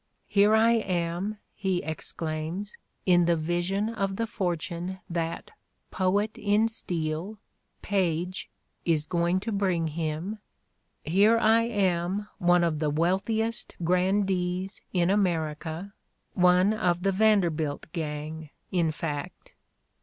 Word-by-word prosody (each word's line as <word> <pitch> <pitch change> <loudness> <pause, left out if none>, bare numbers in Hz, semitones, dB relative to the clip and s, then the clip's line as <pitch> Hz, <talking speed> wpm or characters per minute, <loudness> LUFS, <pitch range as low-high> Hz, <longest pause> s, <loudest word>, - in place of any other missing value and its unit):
"Here 205 +2 +4
I 225 +1 +5
am," 185 -2 -1 0.2
he 190 -3 -1
exclaims, 160 +4 -4 0.3
in 175 -2 +5
the 170 0 +3
vision 175 +6 -1
of 195 -4 -2
the 230 - -1
fortune 175 -2 -3
that 170 - -3 0.4
"poet 200 +3 0
in 210 +2 +3
steel," 175 -1 -3 0.5
Paige, 180 -2 -1 0.3
is 155 -3 +1
going 175 +2 +1
to 225 - -3
bring 185 -5 +1
him 165 +6 -3 0.3
— - - -47 0.3
"here 200 +8 +4
I 225 0 +4
am 195 -2 0
one 175 -1 +4
of 160 -3 0
the 155 -1 +1
wealthiest 195 +9 0
grandees 185 +1 0
in 180 0 +2
America, 165 -1 -1 0.4
one 180 +2 +4
of 180 -5 0
the 195 - +3
Vanderbilt 175 -8 +2
gang, 155 -1 -5 0.2
in 170 -3 +2
fact." 160 - -5
180 Hz, 115 wpm, -27 LUFS, 165-200 Hz, 0.5 s, I